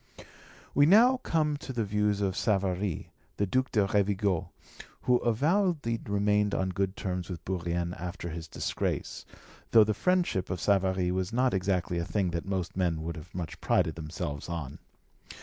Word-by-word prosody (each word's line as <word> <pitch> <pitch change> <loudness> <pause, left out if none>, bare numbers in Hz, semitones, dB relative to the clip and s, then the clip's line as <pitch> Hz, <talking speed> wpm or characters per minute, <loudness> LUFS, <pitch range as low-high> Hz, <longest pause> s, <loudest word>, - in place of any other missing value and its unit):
We 145 0 +5
now 235 +8 +6
come 155 - 0
to 140 - -7
the 120 -3 -1
views 105 0 0
of 95 -2 0
Savary, 95 -4 -1 0.3
the 100 - +2
Duc 130 +6 0
de 105 -3 +3
Rovigo, 100 -3 +1 0.5
who 125 -1 +4
avowedly 145 - +1
remained 105 0 +2
on 95 - 0
good 95 +1 -1
terms 90 -2 -3
with 90 -3 -7
Bourrienne 85 -1 -2
after 90 -1 -6
his 80 0 -6
disgrace, - - -3 0.4
though 110 -2 +7
the 110 +1 +1
friendship 180 - +1
of 90 - -2
Savary 95 -2 +2
was 95 +2 -1
not 125 +2 +2
exactly 90 -2 0
a - - -1
thing 95 -3 0
that 85 -1 -3
most 95 -3 -2
men 85 -4 0
would 85 +1 -4
have 85 +2 -11
much 85 -3 -5
prided 80 - +2
themselves 75 -2 -5
on. 75 -5 -5
95 Hz, 165 wpm, -29 LUFS, 90-110 Hz, 0.5 s, though